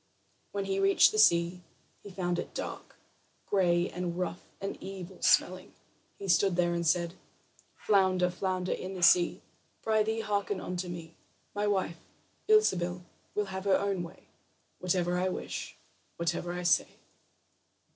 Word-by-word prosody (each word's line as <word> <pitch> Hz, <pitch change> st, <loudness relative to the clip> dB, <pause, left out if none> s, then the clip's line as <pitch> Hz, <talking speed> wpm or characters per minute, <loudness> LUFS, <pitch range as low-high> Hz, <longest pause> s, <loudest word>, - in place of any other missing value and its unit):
When 200 Hz, -1 st, -2 dB
he 195 Hz, 0 st, -1 dB
reached 195 Hz, 0 st, +5 dB
the 215 Hz, -, -1 dB
sea, 170 Hz, -2 st, +4 dB, 0.4 s
he 205 Hz, -, -10 dB
found 180 Hz, -2 st, -2 dB
it -, -, -6 dB
dark, -, -, -6 dB, 0.5 s
gray, 175 Hz, -3 st, +2 dB
and 175 Hz, -1 st, -4 dB
rough, 180 Hz, -1 st, -3 dB, 0.2 s
and 195 Hz, -, -4 dB
evil 190 Hz, -1 st, -8 dB
smelling. 185 Hz, +1 st, +2 dB, 0.4 s
He 200 Hz, -, -7 dB
stood 180 Hz, +1 st, +3 dB
there 175 Hz, -1 st, +2 dB
and 170 Hz, -1 st, -1 dB
said: 170 Hz, +1 st, +1 dB, 0.6 s
"Flounder, 185 Hz, -3 st, +2 dB
flounder 185 Hz, 0 st, -2 dB
in 190 Hz, +1 st, -4 dB
the 180 Hz, -, -4 dB
sea, 175 Hz, 0 st, +5 dB, 0.4 s
Prythee, 220 Hz, 0 st, +1 dB
hearken 205 Hz, -2 st, -1 dB
unto 180 Hz, 0 st, -4 dB
me: 170 Hz, -2 st, -8 dB, 0.4 s
My 205 Hz, 0 st, -1 dB
wife, 190 Hz, -5 st, -1 dB, 0.5 s
Ilsebil, 180 Hz, -, +3 dB, 0.3 s
will 210 Hz, -, +1 dB
have 190 Hz, +1 st, -5 dB
her 195 Hz, -1 st, +4 dB
own 200 Hz, -2 st, -1 dB
way 170 Hz, -1 st, -9 dB, 0.6 s
Whatever 180 Hz, -1 st, 0 dB
I 185 Hz, +1 st, +1 dB
wish, -, -, -5 dB, 0.4 s
whatever 170 Hz, +1 st, -1 dB
I 180 Hz, 0 st, -4 dB
say." 175 Hz, -2 st, +3 dB
185 Hz, 145 wpm, -30 LUFS, 175-195 Hz, 0.6 s, reached